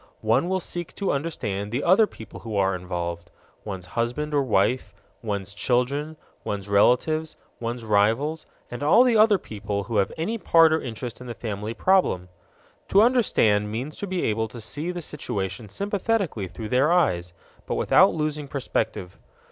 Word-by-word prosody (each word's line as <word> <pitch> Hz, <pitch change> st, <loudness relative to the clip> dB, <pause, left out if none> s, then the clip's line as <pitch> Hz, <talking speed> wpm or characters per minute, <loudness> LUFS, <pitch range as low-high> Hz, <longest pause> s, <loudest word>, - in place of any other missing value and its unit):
One 115 Hz, +11 st, +2 dB
will 190 Hz, 0 st, +1 dB
seek 175 Hz, -1 st, -5 dB
to 200 Hz, -, -1 dB
understand 105 Hz, -9 st, -3 dB
the 125 Hz, +4 st, -1 dB
other 195 Hz, +5 st, +5 dB
people 110 Hz, -, -11 dB
who 110 Hz, -3 st, -6 dB
are 95 Hz, -1 st, +2 dB
involved: 85 Hz, -1 st, -5 dB, 0.3 s
one's 95 Hz, -4 st, -6 dB
husband 125 Hz, +9 st, -2 dB
or 145 Hz, -, +3 dB
wife, 120 Hz, 0 st, +1 dB, 0.3 s
one's 100 Hz, -3 st, -4 dB
children, 135 Hz, +8 st, 0 dB, 0.3 s
one's 100 Hz, -1 st, -4 dB
relatives, 140 Hz, +10 st, +2 dB, 0.2 s
one's 120 Hz, 0 st, -4 dB
rivals, 115 Hz, +9 st, +1 dB, 0.2 s
and 120 Hz, -, -6 dB
all 160 Hz, +12 st, +6 dB
the 245 Hz, -3 st, +3 dB
other 215 Hz, -1 st, +6 dB
people 105 Hz, -, -4 dB
who 110 Hz, +2 st, -3 dB
have 100 Hz, -, +2 dB
any 215 Hz, +9 st, -2 dB
part 165 Hz, -4 st, +5 dB
or 160 Hz, -, +1 dB
interest 120 Hz, 0 st, -6 dB
in 125 Hz, -, -9 dB
the 120 Hz, -, -6 dB
family 105 Hz, +1 st, -5 dB
problem. 180 Hz, -, +2 dB, 0.6 s
To 200 Hz, +2 st, +5 dB
understand 110 Hz, -, +3 dB
means 130 Hz, +8 st, -4 dB
to 200 Hz, -, -4 dB
be 185 Hz, -2 st, -2 dB
able 110 Hz, +1 st, 0 dB
to 115 Hz, +2 st, -10 dB
see 145 Hz, +9 st, -4 dB
the 175 Hz, -1 st, -4 dB
situation 100 Hz, -8 st, -4 dB
sympathetically 200 Hz, -, -1 dB
through 110 Hz, +4 st, -7 dB
their 130 Hz, +5 st, +3 dB
eyes, 90 Hz, -, +2 dB, 0.4 s
but -, -, -1 dB
without -, -, +5 dB
losing 150 Hz, -2 st, -2 dB
perspective. 125 Hz, -9 st, -3 dB
120 Hz, 165 wpm, -25 LUFS, 105-160 Hz, 0.6 s, all